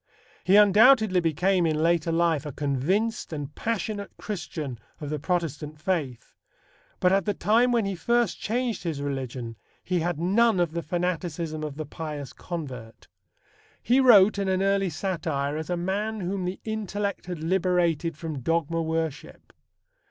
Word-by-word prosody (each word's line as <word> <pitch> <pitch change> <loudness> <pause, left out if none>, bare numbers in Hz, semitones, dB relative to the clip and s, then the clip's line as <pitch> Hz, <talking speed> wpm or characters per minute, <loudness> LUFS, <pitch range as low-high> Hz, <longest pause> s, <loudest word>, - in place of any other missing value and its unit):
He 190 - +4
undoubtedly 210 0 +6
became 175 +2 +2
in 155 - +1
later 170 -1 +2
life 165 -3 +1
a - - -4
convinced 150 - -1
and 145 -2 -5
passionate 215 -1 -3
Christian 155 - -5 0.2
of 150 -1 -5
the 150 - -2
Protestant 155 -2 -2
faith, 155 -8 -3 0.7
but 180 - +3
at 195 0 +2
the 205 -2 0
time 230 +8 +3
when 235 -3 +2
he 195 - -1
first 235 +3 0
changed 240 +1 -1
his 165 -5 -3
religion 130 -5 -4 0.3
he 180 -1 0
had 175 -1 -1
none 205 +4 +3
of 175 -3 +1
the 170 +1 -3
fanaticism 170 -2 -3
of 150 -2 -5
the 155 +1 -5
pious 150 -3 -6
convert. 130 -10 -7 0.7
He 250 +3 +3
wrote 215 -6 +6
in 200 - -1
an 190 0 +1
early 195 -1 +2
satire 155 -4 -2
as 160 +2 -5
a 175 - 0
man 205 +5 -2
whom 185 +1 -2
the 180 +2 -4
intellect 205 -3 -3
had 175 -3 -5
liberated 175 -3 +1
from 155 -3 -5
dogma 165 +3 0
worship. 160 -2 -4
175 Hz, 155 wpm, -26 LUFS, 155-195 Hz, 0.7 s, undoubtedly